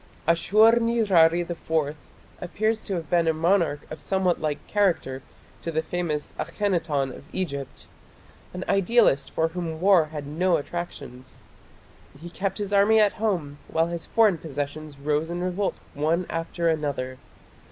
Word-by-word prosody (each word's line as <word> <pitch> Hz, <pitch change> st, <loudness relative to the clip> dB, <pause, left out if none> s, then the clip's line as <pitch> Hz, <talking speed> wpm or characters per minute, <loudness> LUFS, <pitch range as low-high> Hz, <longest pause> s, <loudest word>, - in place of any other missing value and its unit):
Ashur 215 Hz, +8 st, +5 dB
nirari 195 Hz, -8 st, +4 dB
IV 160 Hz, -3 st, -1 dB, 0.5 s
appears 215 Hz, +5 st, -1 dB
to 195 Hz, -, -2 dB
have 165 Hz, -3 st, -4 dB
been 170 Hz, -2 st, +3 dB
a 160 Hz, -, +3 dB
monarch 165 Hz, -3 st, +2 dB
of 155 Hz, -, -7 dB
somewhat 190 Hz, -3 st, 0 dB
like 150 Hz, -2 st, -2 dB
character 170 Hz, -10 st, 0 dB, 0.4 s
to 165 Hz, -, -4 dB
the 160 Hz, 0 st, -1 dB
famous 160 Hz, -4 st, -3 dB
Akhenaton 165 Hz, -7 st, -1 dB
of -, -, -13 dB
Egypt 140 Hz, -8 st, -4 dB, 0.7 s
an 180 Hz, 0 st, -5 dB
idealist 195 Hz, -, +3 dB
for 160 Hz, 0 st, 0 dB
whom 165 Hz, -2 st, -5 dB
war 185 Hz, -3 st, +5 dB
had 150 Hz, -2 st, -7 dB
no 170 Hz, +4 st, +1 dB
attractions. 145 Hz, -5 st, -7 dB, 0.8 s
He 170 Hz, +2 st, -9 dB
kept 195 Hz, +1 st, -3 dB
his 205 Hz, -1 st, -3 dB
army 205 Hz, +2 st, +5 dB
at 210 Hz, -2 st, +4 dB
home 165 Hz, -10 st, -1 dB
while 165 Hz, +1 st, +1 dB
his 170 Hz, -1 st, -5 dB
foreign 215 Hz, -7 st, +3 dB
possessions 145 Hz, 0 st, -5 dB
rose 150 Hz, +3 st, -1 dB
in 175 Hz, +1 st, -3 dB
revolt 185 Hz, +2 st, -1 dB, 0.2 s
one 160 Hz, +5 st, 0 dB
after 165 Hz, +1 st, -2 dB
another. 140 Hz, -5 st, -1 dB
170 Hz, 145 wpm, -25 LUFS, 150-190 Hz, 0.8 s, Ashur